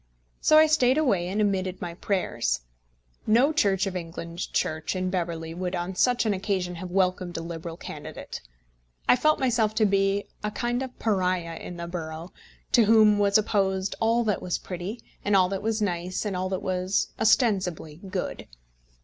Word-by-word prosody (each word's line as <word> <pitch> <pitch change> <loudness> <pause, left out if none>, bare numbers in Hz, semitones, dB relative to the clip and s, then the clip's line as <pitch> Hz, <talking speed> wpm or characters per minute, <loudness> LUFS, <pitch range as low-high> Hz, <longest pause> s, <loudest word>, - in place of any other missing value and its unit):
So 310 - +5
I 310 - +8
stayed 280 -4 +3
away 205 - +2
and 195 +4 -2
omitted 190 -3 0
my 175 -1 -5
prayers. 170 - -1 0.7
No 250 +8 +4
Church 195 - +2
of 190 -1 -4
England 170 0 -5
church 155 +3 -1
in 185 0 -1
Beverley 165 -3 -3
would 180 +1 -3
on 175 +2 -3
such 245 +6 +2
an 215 - +2
occasion 185 -2 -2
have 180 +1 -6
welcomed 185 -1 0
a - - -3
Liberal 165 0 -6
candidate. - - -8 0.7
I - - +7
felt 305 +5 +2
myself 230 -5 +1
to 220 -1 +3
be 195 0 +2 0.2
a 210 - 0
kind 240 +3 -2
of 260 -1 -6
pariah 185 -5 0
in 175 - -8
the 170 - -5
borough, 165 0 -6 0.4
to 235 - +5
whom 215 -1 +5
was 200 0 +4
opposed 195 -3 0
all 230 +2 +2
that 210 -3 0
was 180 - -1
pretty, 185 +6 -6 0.2
and 205 0 +2
all 185 -1 +5
that 195 0 -3
was 220 0 0
nice, 180 +1 -2
and 200 -3 -2
all 185 +1 -2
that 190 -1 -3
was 185 +1 0
ostensibly 190 - +2
good. 185 +1 -5
190 Hz, 175 wpm, -26 LUFS, 180-215 Hz, 0.7 s, I